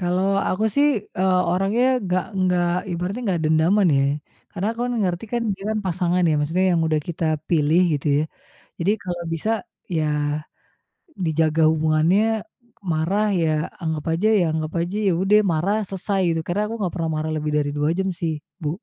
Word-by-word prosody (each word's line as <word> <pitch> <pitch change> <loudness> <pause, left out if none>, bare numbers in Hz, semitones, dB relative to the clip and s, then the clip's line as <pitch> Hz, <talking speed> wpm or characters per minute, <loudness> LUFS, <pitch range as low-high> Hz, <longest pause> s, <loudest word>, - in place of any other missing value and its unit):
Kalau 180 +1 +1 0.2
aku, 200 +4 0
sih, 285 +1 +4 0.3
eee, 185 -1 +3
orangnya 195 +6 +1 0.2
nggak 185 0 0
enggak, 180 -2 +2 0.2
ibaratnya 180 +7 -3
nggak 175 -5 0
dendaman, 160 +6 +3
ye. 135 - +3 0.5
Karena 185 - -3
aku, 230 +1 -6
kan, 245 - -2
ngerti, 180 +1 -1
kan, 240 -1 0
dia, 195 +1 -11
kan, 220 - 0
pasangan, 180 0 +1
ya. - - +2
Maksudnya 165 +6 +1
yang 165 - +2
sudah 155 -1 +1
kita 170 -1 -3 0.2
pilih 160 +1 +3
gitu, 145 - -4
ya. - - +2 0.6
Jadi 180 +4 +2
kalau 175 -1 -4
bisa, 165 +7 -2 0.5
ya, 155 - +1 1.2
dijaga 160 0 +1
hubungannya. 160 +4 +2 0.7
Marah, 180 +7 +1 0.2
ya, 160 - +2 0.3
anggap 160 -2 -2
aja 180 +6 +1
ya - - +3
anggap 155 0 -2
aja, 175 +4 -3
ya, 190 - +4
ude 195 +2 +3 0.2
marah 180 +7 +1
selesai 195 +1 -2
gitu. 165 - -1
Karena 180 +4 0
aku 225 - -4
nggak 185 -3 -1
pernah 165 -2 -1
marah 155 +1 -2
lebih 150 0 -2
dari 145 -1 0
2 145 +1 +1
jam, 190 0 0
sih, 165 -2 -1 0.3
Bu. 150 - 0
175 Hz, 180 wpm, -22 LUFS, 160-190 Hz, 1.2 s, sih